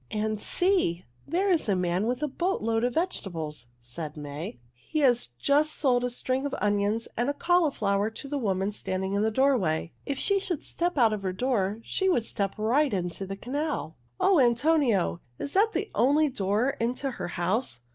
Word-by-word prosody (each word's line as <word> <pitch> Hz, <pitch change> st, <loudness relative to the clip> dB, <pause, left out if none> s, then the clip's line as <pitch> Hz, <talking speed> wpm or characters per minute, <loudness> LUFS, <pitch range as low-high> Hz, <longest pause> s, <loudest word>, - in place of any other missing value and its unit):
"And 215 Hz, 0 st, -2 dB
see! 355 Hz, -, +1 dB, 0.2 s
There 370 Hz, +6 st, +1 dB
is 330 Hz, -10 st, +1 dB
a 200 Hz, -, +3 dB
man 180 Hz, +3 st, 0 dB
with 250 Hz, +4 st, -1 dB
a -, -, +2 dB
boat 345 Hz, -, -1 dB
load 225 Hz, 0 st, +1 dB
of 245 Hz, 0 st, 0 dB
vegetables," 165 Hz, -, -3 dB
said 150 Hz, +6 st, -7 dB
May. 145 Hz, -1 st, -6 dB, 0.2 s
"He 125 Hz, -, -7 dB
has 245 Hz, -4 st, +3 dB
just 295 Hz, -, +2 dB
sold 250 Hz, -4 st, +2 dB
a 250 Hz, -, 0 dB
string 255 Hz, +2 st, -2 dB
of 280 Hz, -, -4 dB
onions 205 Hz, +2 st, +1 dB
and 240 Hz, +4 st, 0 dB
a 285 Hz, -, -1 dB
cauliflower 245 Hz, -, +2 dB
to 225 Hz, +5 st, -8 dB
the 285 Hz, 0 st, -2 dB
woman 195 Hz, -3 st, 0 dB
standing 190 Hz, -1 st, -3 dB
in 200 Hz, -, +1 dB
the 220 Hz, -, +2 dB
doorway. 215 Hz, -, +1 dB
If 280 Hz, -, -1 dB
she 400 Hz, +6 st, +1 dB
should 360 Hz, -5 st, -3 dB
step 350 Hz, -1 st, -2 dB
out 230 Hz, -4 st, +5 dB
of 210 Hz, -, -3 dB
her 190 Hz, -1 st, -2 dB
door 215 Hz, -2 st, 0 dB
she 380 Hz, +9 st, 0 dB
would 240 Hz, -11 st, +2 dB
step 195 Hz, -3 st, -2 dB
right 250 Hz, +7 st, +2 dB
into 185 Hz, 0 st, -3 dB
the 195 Hz, +1 st, -5 dB
canal. 285 Hz, -, -3 dB, 0.2 s
O 385 Hz, -5 st, +4 dB
Antonio! 240 Hz, -, +2 dB, 0.2 s
Is 285 Hz, -, -5 dB
that 430 Hz, +3 st, +3 dB
the -, -, -2 dB
only 295 Hz, +4 st, +3 dB
door 215 Hz, +2 st, +1 dB
into 250 Hz, +4 st, -1 dB
her 240 Hz, -, -5 dB
house?" 180 Hz, -, -1 dB
230 Hz, 190 wpm, -27 LUFS, 195-285 Hz, 0.2 s, out